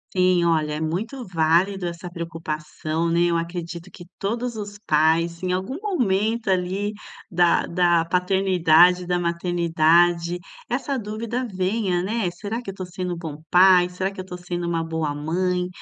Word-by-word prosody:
Sim, 180 -1 +3
olha, 155 -3 +1
é 150 - -3
muito 220 - -3
válido 175 +2 +1
essa 170 +1 -6
preocupação, 165 -1 -4
né, 170 +1 +2
eu - - +1
acredito 170 +1 -4
que 175 - -12
todos 235 +4 -2
os 205 -1 -6
pais, 165 +2 +2
em 185 -1 -1
algum 210 - -3
momento, 225 - 0
ali, 190 +3 -1 0.4
da 175 -1 +3
da 175 -1 +2
paternidade, 180 -1 +4
e - - -10
da 180 0 +1
maternidade, 170 0 +2 0.3
essa 275 -3 -1
dúvida 230 +4 -4
venha, 185 -1 0
né, 210 -1 -1
"será 215 +6 -5
que 240 - -8
eu 195 - -6
tô 185 -1 -5
sendo 180 -1 -4
bom 155 -3 -7
pai? 180 0 +6
Será 185 +2 -3
que 195 - -7
eu - - -10
tô 180 -1 -7
sendo 175 -1 -4
uma 165 -1 0
boa 160 -2 -2
mãe?" 180 +4 -1
180 Hz, 165 wpm, -23 LUFS, 170-195 Hz, 0.4 s, pai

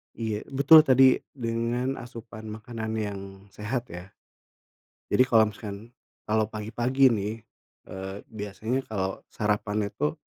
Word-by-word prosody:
Iya, 110 -2 -3
betul 140 +3 +8
tadi 130 0 +6 0.2
dengan 120 +2 -1
asupan 115 -3 -10
makanan 110 +1 -6
yang 105 -2 -3 0.3
sehat 120 +4 -4
ya. 90 +2 -8 1.0
Jadi 130 - +5
kalau 110 -4 +4
misalkan, 105 +1 -8 0.4
kalau 110 0 +3
pagi-pagi 120 +5 +2
nih, 105 -1 -1 0.6
eee, 95 +1 -6
biasanya 110 +5 -3
kalau 95 -3 -3
sarapan 105 -1 0
itu, 150 +8 -1
110 Hz, 115 wpm, -27 LUFS, 105-125 Hz, 1.0 s, betul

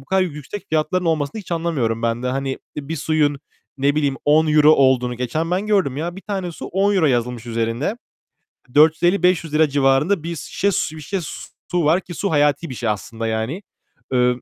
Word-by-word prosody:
bu - - -16
kadar 190 +5 +2
yüksek 165 +3 -6
fiyatların 160 +4 0
olmasını 160 +2 -1
hiç 180 - -8
anlamıyorum 140 -10 -1
ben 115 +1 -1
de. - - -2
Hani, 135 +1 -2 0.2
bir 150 +2 -4
suyun, 150 -1 +1 0.4
ne 140 +1 +2
bileyim, 145 -3 0
€10 155 0 +5
olduğunu 130 -2 +3
geçen 125 +7 -2
ben 185 +4 0
gördüm, 195 -11 +1
ya, 170 +4 -4
1 - - -8
tane 190 -4 -4
su - - -8
€10 195 -2 +2
yazılmış 120 -2 -1
üzerinde. 115 - -2 0.8
₺450-₺500 160 0 +3
civarında 140 +6 +2
bir 170 +1 -4
şişe 200 +5 -1
su 160 -3 -1
bir 155 - -9
şişe 195 +6 -3 0.5
su 175 -3 +1
var 165 +5 +3
ki 180 - -9
su 200 +4 -2
hayati 145 +2 +2
bir 130 - -6
şey 120 -1 -2
aslında, 110 +3 -3
yani. 110 - -2 0.5
Iıı, 125 0 +2
150 Hz, 180 wpm, -21 LUFS, 130-175 Hz, 0.8 s, €10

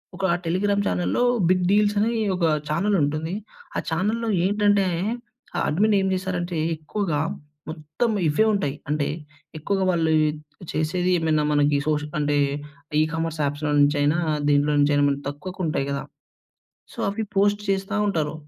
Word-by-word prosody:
ఒక 195 - -2 0.2
Telegram 200 +4 +1
చానెల్‌లో 90 - 0 0.3
big 180 -1 +3
deals 205 0 +3
అని 230 +3 +1 0.2
ఒక 175 -2 0 0.2
చానెలుంటుంది. 160 -2 0 0.4
ఆ - - +1
చానెల్‌లో 215 +8 -1 0.2
ఏంటంటే, 205 -1 +3 0.7
ఆ - - 0
అడ్మిన్ 205 +6 +2
ఏం 190 - 0
చేశారంటే 180 -2 -2 0.2
ఎక్కువగా 160 -1 -2 0.5
మొత్తం 155 +9 -2 0.2
ఇవే 155 +9 +3
ఉంటాయి. 150 -8 -1
అంటే 150 -1 0 0.5
ఎక్కువగా 190 +4 -1
వాళ్ళు 165 -2 +1 0.6
చేసేది 175 +4 0
ఏమైనా 155 -2 +1
మనకి 145 0 +3
సోష్ 150 -1 0 0.2
అంటే 145 0 +1 0.6
ఈ - - +5
కామర్స్ 165 -1 -2
అప్స్‌లో 150 +1 -2
నుంచి 145 +1 +4
అయినా, 150 +4 +2 0.3
దీంట్లో 145 +1 +3
నుంచి 145 +1 +3
అయిన 145 0 +3
మనకు 140 0 -3
తక్కువకు 180 +7 -8
ఉంటాయి 150 -3 -1
కదా! 140 - -2 0.9
సో, - - -16
అవి 205 +3 -2
పోస్ట్ 205 +1 +3
చేస్తా 195 +1 -1
ఉంటారు. 155 -6 -1
165 Hz, 145 wpm, -24 LUFS, 150-200 Hz, 0.9 s, ఈ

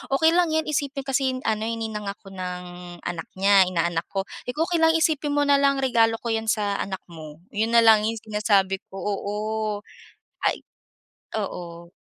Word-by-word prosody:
okey 320 +3 +5
lang 350 +1 +3
yan, 315 0 +2
isipin 285 -2 -2
kasi 265 -1 +1
yun 255 - -6
ano, 220 0 0
eh, 230 - -1
ninang 220 -2 -4
ako 200 0 -7
ng 180 -1 -5 0.4
anak 175 -2 -4
niya, 195 0 +5
inaanak 170 -1 0
ko. 195 -1 0 0.2
Sabi 250 - -3
ko, 315 - +2
okey 345 - +1
lang, 325 0 +5
isipin 310 -2 +1
mo 290 - +3
nalang 280 -1 +3
regalo 230 -3 +3
ko 235 - -1
yan 225 0 -1
sa 205 -2 0
anak 190 -1 -4
mo. 155 -1 -11
Yun 225 +3 0
nalang 220 -2 +6
yung 225 - -1
sinasabi 205 -3 +1
ko, - - -14
oo. 200 +1 -3 1.1
Ay - - +1 0.8
oo. 170 -3 -7
220 Hz, 180 wpm, -24 LUFS, 190-270 Hz, 1.1 s, nalang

